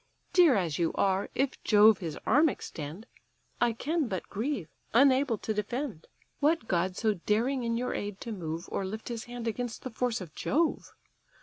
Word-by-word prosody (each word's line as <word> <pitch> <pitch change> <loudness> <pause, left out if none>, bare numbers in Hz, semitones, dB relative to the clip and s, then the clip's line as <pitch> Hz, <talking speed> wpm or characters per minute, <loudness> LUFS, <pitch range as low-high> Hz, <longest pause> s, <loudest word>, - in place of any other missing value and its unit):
Dear 345 -7 +6
as 175 -6 0
you 165 -1 +1
are, 195 0 +1
if 270 0 -1
Jove 210 -1 +6
his 165 -4 -5
arm 295 +7 +5
extend, 160 - -7 0.6
I 240 -1 +4
can 300 +6 -1
but 190 -5 -4
grieve, 225 - -2 0.3
unable 265 -2 +5
to 220 - -3
defend. 215 - -3 0.3
What 300 -5 +2
god 180 +1 0
so 220 -2 +2
daring 230 +8 0
in 230 0 0
your 250 +1 -1
aid 205 -1 -4
to 230 - -5
move, 165 -4 -5
Or - - -1
lift 215 +5 -5
his 235 -2 -4
hand 240 -1 -6
against 235 +1 -3
the 255 - -5
force 240 +1 -1
of 175 -6 -9
Jove? 315 - 0
225 Hz, 180 wpm, -29 LUFS, 190-255 Hz, 0.6 s, Dear